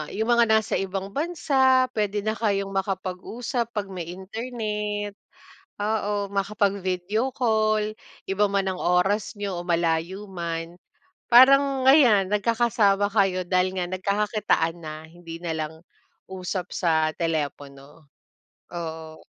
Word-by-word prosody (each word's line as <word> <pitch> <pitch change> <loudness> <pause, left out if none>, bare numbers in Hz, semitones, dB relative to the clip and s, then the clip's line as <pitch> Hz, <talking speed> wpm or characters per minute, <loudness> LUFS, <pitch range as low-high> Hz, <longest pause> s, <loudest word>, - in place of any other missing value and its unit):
yung 220 +3 0
mga 235 -1 +5
nasa 220 0 +2
ibang 195 0 -4
bansa 265 -5 +2
pwede 205 -2 -1
na 215 - 0
kayong 200 -3 -1
makapag-usap 195 +5 -3
pag 200 -2 -3
may 175 -3 -6
internet. 210 0 -4 0.7
Oo, 205 -2 -1
makapag-video 200 +3 -1
call, 215 -3 +1 0.3
iba 195 +2 +1
man 195 -1 0
ang 185 - -6
oras 195 +5 +1
niyo 200 -3 -4
o 175 - -8
malayo 170 +4 -1
man, 170 0 -5 0.5
parang 270 +2 +6
ayan 245 -9 +6
nagkakasama 210 -1 +2
kayo 185 -3 +2
dahil 185 +1 +1
nga 175 - -1
nagkakakitaan 200 -3 0
na, 155 0 -5
hindi 165 0 -10
nalang 160 -2 -4 0.5
usap 185 0 -4
sa 160 -3 +1
telepono. 145 -2 -5 0.6
Oo. 160 -2 -7
195 Hz, 115 wpm, -25 LUFS, 175-215 Hz, 0.7 s, parang